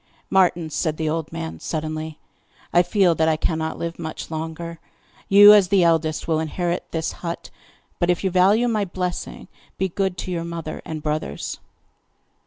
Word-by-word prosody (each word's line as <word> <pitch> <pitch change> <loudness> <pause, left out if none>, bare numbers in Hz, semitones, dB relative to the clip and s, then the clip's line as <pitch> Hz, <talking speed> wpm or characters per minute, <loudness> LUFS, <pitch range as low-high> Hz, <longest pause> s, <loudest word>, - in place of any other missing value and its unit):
'Martin,' 175 -4 +3
said 155 +1 -1
the 160 - -2
old 160 0 -2
man 80 0 -5
suddenly, 155 - -4 0.6
'I 175 - +6
feel 180 0 +3
that 160 0 +2
I 155 - +2
cannot 160 0 -2
live 170 0 -5
much 160 0 -6
longer. 160 +1 -5 0.5
You, 205 +1 +10
as 205 -3 +6
the 190 -1 +4
eldest, 160 -2 +1
will 160 -2 +1
inherit 175 +3 -2
this 160 -1 -2
hut; 170 -1 -6 0.5
but, 175 - +1
if 175 +1 +1
you 190 - +1
value 200 +6 +4
my 215 -3 +1
blessing, 180 -1 -4 0.3
be 190 - 0
good 190 0 -1
to 185 - -5
your 170 -2 -2
mother 170 -2 -6
and 155 -2 -6
brothers. 150 - -3
170 Hz, 170 wpm, -22 LUFS, 160-180 Hz, 0.6 s, You